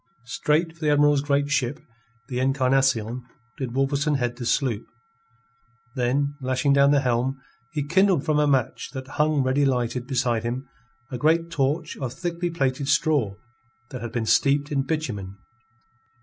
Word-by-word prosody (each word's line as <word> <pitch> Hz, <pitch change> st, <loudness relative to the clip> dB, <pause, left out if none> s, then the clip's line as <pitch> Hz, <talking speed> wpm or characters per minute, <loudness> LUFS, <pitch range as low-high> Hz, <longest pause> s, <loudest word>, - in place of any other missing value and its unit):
Straight 155 Hz, +6 st, 0 dB
for 165 Hz, -, -24 dB
the 150 Hz, -, +2 dB
Admiral's 145 Hz, -1 st, +4 dB
great 145 Hz, 0 st, 0 dB
ship, 135 Hz, -1 st, 0 dB, 0.5 s
the 125 Hz, -2 st, -3 dB
Encarnacion, 130 Hz, -3 st, +1 dB, 0.4 s
did 130 Hz, -3 st, -4 dB
Wolverstone 140 Hz, +2 st, +1 dB
head 120 Hz, -2 st, -2 dB
the 120 Hz, -2 st, -4 dB
sloop; 120 Hz, -7 st, 0 dB, 1.1 s
then, 135 Hz, +3 st, 0 dB
lashing 130 Hz, +2 st, +1 dB
down 140 Hz, 0 st, +5 dB
the 145 Hz, -1 st, +4 dB
helm, 130 Hz, +1 st, 0 dB, 0.3 s
he 150 Hz, -1 st, -2 dB
kindled 185 Hz, -1 st, +3 dB
from 155 Hz, -2 st, +2 dB
a 150 Hz, -, +3 dB
match 130 Hz, -3 st, 0 dB
that 130 Hz, -1 st, -6 dB
hung 150 Hz, -2 st, +2 dB
ready 130 Hz, +2 st, +2 dB
lighted 125 Hz, -2 st, 0 dB
beside 125 Hz, -4 st, 0 dB
him 125 Hz, +4 st, -4 dB, 0.4 s
a 125 Hz, -, -4 dB
great 165 Hz, +4 st, +2 dB
torch 150 Hz, +1 st, -1 dB
of 130 Hz, -3 st, -4 dB
thickly 175 Hz, 0 st, -3 dB
plaited 135 Hz, -4 st, -1 dB
straw 145 Hz, -8 st, +2 dB, 0.6 s
that 130 Hz, -3 st, -6 dB
had 120 Hz, -1 st, -5 dB
been 115 Hz, -1 st, -2 dB
steeped 140 Hz, +5 st, +2 dB
in 140 Hz, -2 st, +1 dB
bitumen. 120 Hz, -10 st, -4 dB
135 Hz, 155 wpm, -24 LUFS, 125-150 Hz, 1.1 s, down